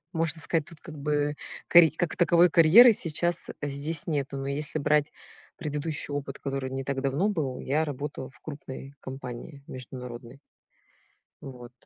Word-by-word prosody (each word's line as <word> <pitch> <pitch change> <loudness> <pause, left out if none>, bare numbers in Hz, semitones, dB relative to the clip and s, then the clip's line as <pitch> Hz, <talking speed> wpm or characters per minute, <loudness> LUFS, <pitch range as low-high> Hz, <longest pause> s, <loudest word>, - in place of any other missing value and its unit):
Можно 165 -2 -1
сказать 160 -1 0
тут 165 - -15
как 160 -3 -10
бы 145 0 0 0.3
карит 165 -2 +7
как 175 -2 -1
таковой 175 0 +5
карьеры 180 +10 +8
сейчас 175 -2 0 0.2
здесь 145 +2 -2
нету. 140 -3 -2
Но 135 - -4
если 145 +2 -2
брать 150 0 +2 0.4
предыдущий 150 -2 -4
опыт, 140 -1 -4
который 135 -1 -4
не 135 0 -4
так 135 0 -2
давно 140 +9 +1
был, 150 -10 -2
я 150 +4 0
работала 145 -2 -5
в 120 - -21
крупной 140 -2 -9
компании 130 +2 -8
международной. 125 0 -9 1.0
Вот. 125 -3 -10
145 Hz, 145 wpm, -27 LUFS, 135-160 Hz, 1.0 s, карьеры